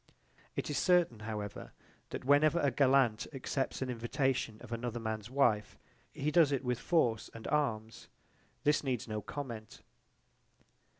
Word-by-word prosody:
It - - -2
is - - 0
certain 175 - +3
however 105 -2 -6 0.4
that - - -6
whenever 145 +4 +5
a 140 -4 +2
gallant 130 -4 +3
accepts 135 0 -2
an 130 - -4
invitation 120 -1 -1
of 120 - -11
another 120 0 -3
man's 110 -1 -4
wife 120 -6 +2 0.3
he 150 +2 -2
does 155 -2 +5
it 140 -2 0
with 125 -1 -1
force 120 -11 +1
and 115 - -9
arms. 115 -7 -1 0.6
This 150 0 +3
needs 125 -5 -2
no 110 -1 -3
comment. 115 -4 -7
125 Hz, 140 wpm, -33 LUFS, 110-140 Hz, 0.6 s, whenever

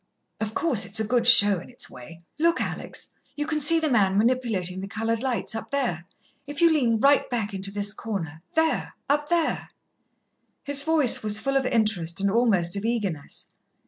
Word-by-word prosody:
"Of 220 0 -4
course, 260 -11 +1
it's 200 +1 -1
a - - +1
good 235 +1 +1
show 205 -5 +7
in - - -12
its 245 - -6
way. 165 +7 -13 0.2
Look, 335 +2 +2
Alex, - - -5 0.3
you 295 - -3
can 305 -1 -2
see 330 +3 +6
the 320 - 0
man 200 -8 +2
manipulating 215 -6 0
the 195 - -6
coloured 225 +2 -2
lights, 255 -4 -2
up 225 - -6
there. 235 -12 -2 0.4
If 290 +1 -6
you 335 -1 +5
lean 240 -8 +2
right 280 +4 +3
back 220 -5 -3
into 195 0 -1
this 205 0 -3
corner 165 -10 -6
there, 320 0 0
up 295 +1 0
there." 340 -2 0 0.9
His 280 0 +2
voice 305 -5 +3
was 215 0 0
full 275 +3 -2
of 265 -1 +1
interest 200 -8 0
and 200 0 +1
almost 205 -7 +2
of 200 - -4
eagerness. 205 -10 -4
225 Hz, 185 wpm, -25 LUFS, 200-280 Hz, 0.9 s, show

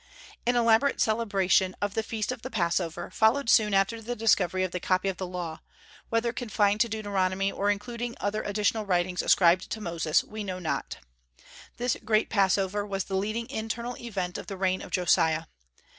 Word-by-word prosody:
An 245 - +3
elaborate 235 +3 +3
celebration 195 -4 +2
of 205 -1 -2
the 225 - 0
feast 220 +1 -3
of 250 -2 -6
the 260 - -6
Passover 175 -5 -1
followed 230 +3 +3
soon 210 -1 +5
after 195 +4 +1
the 240 +2 -4
discovery 190 -5 +2
of 185 - -2
the 180 - -3
copy 185 +2 +1
of 190 - -4
the 185 - -4
Law, 175 -3 -5 0.5
whether 230 +1 0
confined 210 -3 +1
to 235 - +3
Deuteronomy 195 -3 0
or 200 +1 -1
including 235 +4 -3
other 210 +1 -1
additional 210 +1 0
writings 180 -2 0
ascribed 180 +1 +4
to 220 - -4
Moses, 170 -5 0
we 215 0 -7
know 185 -2 -4
not. 175 -4 -3 0.8
This 245 0 0
great 215 0 +1
Passover 195 0 +2
was 195 -2 -3
the 195 - -4
leading 215 +4 -2
internal 230 +2 -4
event 190 -6 -4
of - - -9
the 195 - -6
reign 185 0 0
of - - -9
Josiah. 160 -3 +2
205 Hz, 180 wpm, -27 LUFS, 185-225 Hz, 0.8 s, soon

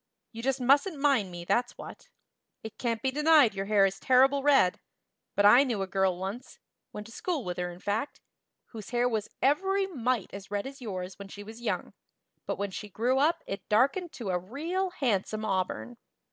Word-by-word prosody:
You 230 - -7
just 270 +2 0
mustn't 280 +7 +3
mind 275 -9 +2
me, 175 -1 -8
that's 245 +6 0
what. - - -11 0.5
It 220 -1 -9
can't 230 -2 -2
be 265 - +1
denied 300 -5 +5
your 195 0 -4
hair 205 -2 +5
is 195 0 -2
terrible 270 +2 +4
red; 270 -10 +4 0.6
but 200 - +3
I 240 +6 +8
knew 230 -8 -1
a - - -2
girl 190 -1 +1
once 195 +7 -6 0.3
went 210 - -7
to 230 - -12
school 330 -4 -2
with 180 0 -4
her, 180 0 -2
in 175 0 -10
fact 215 +9 -3 0.5
whose 220 -3 -9
hair 245 0 +1
was 220 -4 -2
every 385 +8 +2
mite 255 - -2
as 195 -1 -9
red 205 0 -2
as 270 0 -9
yours 185 -4 -6
when 200 - -8
she 205 +1 -9
was 220 +3 -11
young, 240 - -3 0.5
but - - -2
when 200 0 -3
she 210 +2 -7
grew 245 +7 +1
up 310 +4 +2
it 195 - -7
darkened 275 - +2
to 215 -6 -4
a 180 - 0
real 325 - -3
handsome 220 - -1
auburn. 195 +4 -2
230 Hz, 200 wpm, -29 LUFS, 195-270 Hz, 0.6 s, I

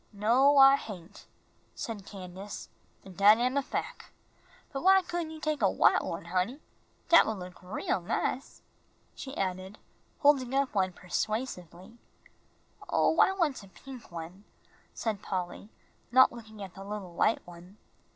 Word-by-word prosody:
"No, 240 +8 +3
I 270 0 +8
hain'," 185 -10 -9 0.6
said 210 -4 -6
Candace, 190 +1 -8 0.4
"an' 190 - -11
dat 205 +4 +6
am 250 +3 0
a 280 - +2
fac'. - - -5 0.6
But 270 - -3
why 385 +1 +5
couldn' 345 -2 -4
you 315 0 -9
take 310 -3 -2
a 195 - +4
white - - +3
one, 165 0 -5
honey? 185 - -1 0.5
Dat 335 - +7
would 220 -1 -2
look 180 -1 -10
real 180 0 -2
nice," 250 +9 -3 0.5
she 270 0 -8
added, 190 +1 -3 0.4
holding 280 -4 +4
one 270 +2 +2 0.3
up 180 - -19
persuasively. 195 0 -4 0.9
"Oh, 325 - +2
I - - +6
want 330 - 0
a 195 - -14
pink 255 +2 -12
one," 170 +4 -8 0.5
said 215 -3 -3
Polly, 185 +1 -5 0.4
not 260 +1 +6
looking 220 -3 -10
at 190 -2 -9
the 195 - -10
little 200 -3 -7
white 220 - +1
one. 175 +3 -14
210 Hz, 150 wpm, -29 LUFS, 185-270 Hz, 0.9 s, I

